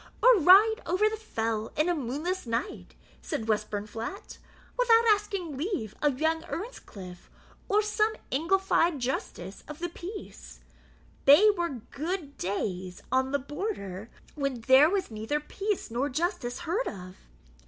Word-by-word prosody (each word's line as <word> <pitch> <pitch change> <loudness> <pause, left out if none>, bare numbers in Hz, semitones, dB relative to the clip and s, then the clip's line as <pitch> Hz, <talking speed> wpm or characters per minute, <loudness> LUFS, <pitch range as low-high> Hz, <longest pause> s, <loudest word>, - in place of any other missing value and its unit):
"Or - - +9
ride 400 +7 +7
over 370 +5 +3
the 435 - -1
fell 225 - -3
in 305 +3 +2
a 355 - +2
moonless 305 +4 -3
night," 230 +1 -3 0.3
said 220 - -3
Westburnflat, 215 - -3 0.4
"without 470 -2 +5
asking 400 -7 -1
leave 285 - -3
of 285 -3 +1
young 320 +1 +1
Earnscliff; 200 - -8 0.4
or 420 +1 +3
some 430 +1 +1 0.2
Englified 335 +1 +2
justice 245 -6 -4
of 300 - -8
the 350 +1 -3
peace: 370 +5 -9 0.7
thae 360 +10 +8
were 340 - -3
gude 315 0 -4
days 185 -1 -3
on 260 0 +2
the 285 - +2
Border 260 - -5 0.2
when 275 -5 -2
there 265 +6 +6
was 385 -8 -1
neither 220 +7 -2
peace 395 - -3
nor 255 +5 0
justice 310 -3 -2
heard 355 +9 -1
of." 185 -2 -8
300 Hz, 135 wpm, -28 LUFS, 230-385 Hz, 0.7 s, Or